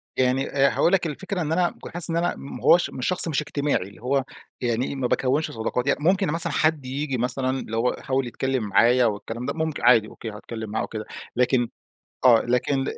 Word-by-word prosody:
يعني 130 +1 +1
آآ 140 0 +3
هاقول 175 - +2
لك 175 -3 +2
الفكرة 185 +5 -4
إن 155 -1 -2
أنا 175 +1 +2
ك - - -6
حاسس 175 -1 +2
إن 165 - 0
أنا 175 +1 0
ما 140 - -9
هواش 175 - +5
مش 130 - -4
شخص 185 -1 +3
مش 150 -2 0
اجتماعي 145 -1 -1
اللي 105 - -17
هو 135 +2 +1 0.4
يعني 120 +3 -1
ما 130 -2 -1
باكوِّنش 135 +6 0
صداقات 120 +3 -2
يعني. 140 - +2
ممكن 190 +3 +3
مثلًا 165 -2 0
حد 155 -4 +1
ييجي 135 0 -3
مثلًا 130 +2 -1
اللي 115 - -5
هو 120 +2 +1
يحاول 135 -3 -1
يتكلم 130 0 -2
معايا 120 +5 +4
والكلام 115 +3 -3
ده - - -2
ممك 160 -1 -2
عادي 115 -3 +5
أوكي 110 - -8
هاتكلم 110 +1 -7
معاه 110 +2 -2
أو - - -3
كده، 110 -1 -6 0.3
لكن 125 -1 +2 0.6
آه 120 -3 +7
لكن 135 +3 0
130 Hz, 215 wpm, -24 LUFS, 120-155 Hz, 0.6 s, آه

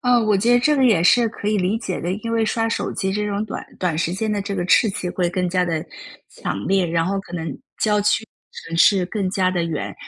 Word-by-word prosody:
啊， 245 -1 +3
我 215 -3 +2
觉 230 +5 +2
得 - - +6
这 300 +4 +3
个 265 - +3
也 215 -9 +4
是 235 +6 +5
可 210 -1 -5
以 215 - +1
理 190 +3 0
解 190 -6 -4
的， 175 +2 -2
因 215 +3 -5
为 225 -1 +2
刷 225 +1 0
手 - - -2
机 190 -1 -2
这 210 +1 -1
种 205 +1 -2
短 - - -6
短 175 -4 -1
时 165 +1 -1
间 215 +3 -2
的 205 - -1
这 200 0 -4
个 180 - -2
刺激 190 -2 +2
会 175 -1 -1
更 180 0 -1
加 180 0 +1
地 165 -3 -2 0.4
强 100 - -5
烈， 195 -1 +3
然 165 0 0
后 195 +1 -1
可 190 - -15
能 165 -2 -3 0.3
郊 210 -1 +2
区 210 +2 +1 0.4
城 165 - -4
市 185 +1 +4
更 195 -1 -2
加 185 -1 +1
地 175 -2 -1
远， 165 -3 -4
195 Hz, 280 characters per minute, -21 LUFS, 180-215 Hz, 0.4 s, 得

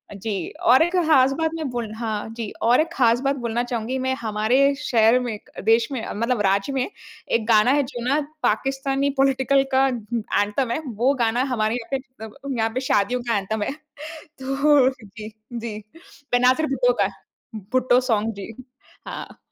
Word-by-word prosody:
जी, 195 -3 -4
और 255 +5 +5
एक 345 +2 -1
खास 270 -4 +5
बात 320 +2 -1
मैं 315 -4 -3
बोल 240 -3 -4
हाँ 220 -2 -3
जी 225 -3 -4
और 240 +6 +4
एक 330 - -2
खास 235 -2 +3
बात 275 +1 +2
बोलना 240 -2 -2
चाहूँगी 245 +1 -3
मैं 260 0 0
हमारे 235 +6 +2
शहर 230 -3 +3
में 240 -4 -3 0.3
देश 225 +1 +4
में 255 -4 -3
मतलब 230 +1 0
राज्य 200 +8 +1
में 260 -2 0 0.4
एक 225 -2 +1
गाना 225 +1 +5
है 285 +1 +3
जो 245 -3 -7
ना 285 +3 +2 0.2
पाकिस्तानी 270 +4 0
पॉलिटिकल 270 0 +3
का 265 +1 +5
उम, 240 -5 -4 0.4
एंथम 210 +5 -1
है 240 - -1
वो 240 +4 +1
गाना 235 +3 +1
हमारे 220 0 0
यहाँ 240 -2 -6
पे 270 - +1 0.3
मतलब 255 +4 -7
यहाँ 225 0 +1
पे 255 - -1
शादियों 245 +5 +1
का 225 - +2
एंथम 210 +2 -2
है। - - -2 0.6
तो 270 -1 +2
जी, 215 +1 -9 0.2
जी। 230 -2 -5 0.5
बेनज़ीर 255 +5 +3
भुट्टो - - +2
का - - +2 0.7
भुट्टो 255 -1 +4
सॉन्ग 225 -3 0
जी। 200 +3 -8 0.5
हाँ। - - -8
245 Hz, 175 wpm, -23 LUFS, 220-270 Hz, 0.7 s, और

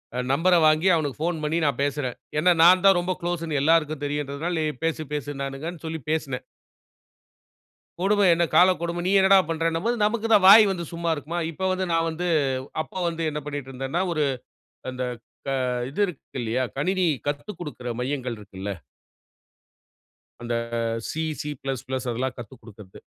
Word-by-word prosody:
அ - - -1
நம்பர 175 +5 +3
வாங்கி 155 +4 +3
அவனுக்கு 145 -4 -2
ஃபோன் 170 0 0
பண்ணி 155 +2 0
நான் 145 - 0
பேசுறேன். 140 -3 -2 0.2
ஏன்னா, 180 +4 +4
நான் 180 +2 +7
தான் 195 -2 +7
ரொம்ப 180 +1 -1
குளோஸ்ன்னு 165 -4 -2
எல்லாருக்கும் 155 -1 +2
தெரியுன்றதனால, 145 +4 -3
நீ - - 0 0.2
பேசு, 165 -1 -1
பேசுனுன்னாங்கன்னு 145 +3 -5
சொல்லி 160 0 -4
பேசுனேன். 135 -5 -2 1.6
கொடும 205 +2 +3
என்ன 170 +1 +3
காலக்கொடும? 175 -1 +3
நீ - - +1
என்னடா 195 0 +6
பண்றன்னும்போது, 165 +8 0
நமக்கு 220 +1 0
தான் 205 -3 +6
வாய் 215 +2 +10
வந்து 175 -3 -3
சும்மா 170 0 -2
இருக்குமா? 155 +4 -5
இப்ப 190 +4 -2
வந்து 185 0 -1
நான் 165 0 +2
வந்து 170 +3 -4 0.6
அப்ப - - -18
வந்து 165 -1 -3
என்ன 150 - -4
பண்ணீட்டுருந்தேன்னா, 135 +2 -3
ஒரு 155 -2 +1 0.7
அந்த 130 0 -4 0.4
க - - -5 0.4
இது 150 - -5
இருக்கு 160 -6 -9
இல்லையா? 120 +3 -1
கணினி 185 +5 +1 0.2
கத்துக் 150 +7 -4
குடுக்குற 145 -7 -6
மையங்கள் 125 -2 -3
இருக்குல்ல? 100 -1 -7 1.7
அந்த 120 0 -2 0.6
சி, 160 - -3 0.2
சி 150 -2 -4
பிளஸ் 135 -2 -4
பிளஸ் 130 -1 -3
அதெல்லாம் 125 +2 -2
கத்து 120 +1 -9
குடுக்கறது. 105 -4 -13
155 Hz, 155 wpm, -25 LUFS, 135-175 Hz, 1.7 s, வாய்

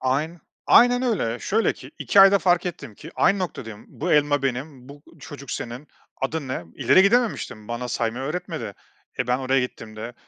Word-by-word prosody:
Ayn 150 +6 -1 0.3
aynen 245 +1 +5
öyle. 195 - -1
Şöyle 220 - +1
ki - - -13
2 200 - +4
ayda 195 +1 +7
fark 180 -1 +2
ettim 175 -11 -7
ki 160 - -11
aynı 200 - +3
noktadayım. 115 - -6
"Bu 175 +4 -3
elma 145 -1 +3
benim, 130 0 -4
bu 145 +1 -13 0.2
çocuk 140 -2 -10
senin, 125 +5 -6 0.3
adın 140 0 -2
ne?" 130 - -4
İleri 190 - +4
gidememiştim. 200 - 0
Bana 120 +1 -4
saymayı 120 +2 -2
öğretmedi. 165 +5 -5 0.4
E, 125 - -1
ben 125 +1 +1
oraya 135 0 +1
gittiğimde, 115 -2 -7
140 Hz, 170 wpm, -23 LUFS, 125-180 Hz, 0.4 s, ayda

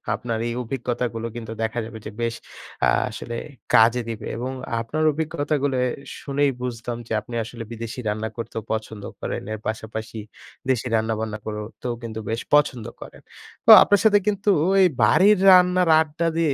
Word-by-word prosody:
আপনার 115 -2 -3
এই 120 - -2
অভিজ্ঞতাগুলো 120 -2 -3
কিন্তু 115 -2 -7
দেখা 110 +2 -2
যাবে 110 0 -9
যে 110 - -6
বেশ 115 0 -1 0.5
আ - - +4 0.2
আসলে 120 - -7 0.4
কাজে 115 +2 +5
দিবে। 115 - -5
এবং 125 +2 -3 0.3
আপনার 155 +7 -2
অভিজ্ঞতাগুলো 145 -3 -1 0.4
শুনেই 140 0 +1
বুঝতাম 120 -1 -4
যে - - -15
আপনি 120 +3 -12
আসলে 115 +1 -8
বিদেশি 115 +2 -6
রান্না 110 +1 -2
করতেও 115 -1 -5
পছন্দ 110 -1 -4 0.2
করেন। - - -4
এর 110 - -5
পাশাপাশি 110 0 -5 0.5
দেশি 125 -1 +1
রান্নাবান্না 110 -1 -1
করতেও 110 +3 -5
কিন্তু 110 -1 -5
বেশ 115 +1 -2
পছন্দ 135 -6 +3 0.2
করেন। - - -11 0.4
তো - - +8
আপনার 205 -1 +3
সাথে 205 -1 +6
কিন্তু 205 0 +1 0.3
এই 185 - +7 0.2
বাড়ির 195 - +5
রান্নার 180 -1 +5
আড্ডা 160 +2 -1
দিয়ে 160 -4 +2
120 Hz, 155 wpm, -23 LUFS, 110-145 Hz, 0.5 s, তো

